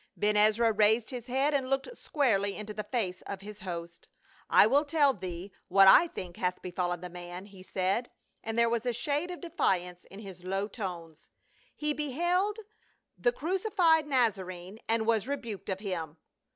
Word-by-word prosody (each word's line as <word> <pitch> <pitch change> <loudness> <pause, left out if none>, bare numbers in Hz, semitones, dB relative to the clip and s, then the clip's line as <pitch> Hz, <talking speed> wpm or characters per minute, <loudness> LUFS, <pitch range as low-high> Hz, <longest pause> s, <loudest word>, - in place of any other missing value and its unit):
'" - - -42
Ben 210 0 +2
Ezra 215 +2 +4
raised 220 +2 +3
his 245 -1 -6
head 270 +4 +1
and 265 -2 0
looked 270 - -1
squarely 205 - 0
into 210 0 -6
the 210 - -4
face 205 -5 -2
of 195 -1 -5
his 210 +1 -10
host. 170 -4 -7 0.2
" - - -28
I - - +7
will 275 +7 +4
tell 290 -2 +3
thee 185 -2 -7 0.2
what 195 +1 +6
I 335 - +8
think 180 - -8
hath 180 0 -1
befallen 175 -1 -2
the 180 - -5
man," 175 +1 -8
he 195 -2 -14
said, 190 +5 -1 0.3
and 225 +1 -4
there 235 0 +5
was 230 -1 0
a 245 - +1
shade 290 +8 -1
of 355 - -7
defiance 180 - -1
in 195 - -13
his 190 -4 -10
low 195 +2 -1
tones. 175 -7 -7 0.2
" - - -34
He 300 0 -1
beheld 345 - 0 0.6
the - - +2
cruci 380 +4 -2
fied 320 -4 +4
Nazarene 195 -7 -1
and 225 0 +1
was 225 0 +1
rebuked 235 -9 -5
of 190 0 -2
him." 170 -6 -4
215 Hz, 190 wpm, -30 LUFS, 185-270 Hz, 0.6 s, I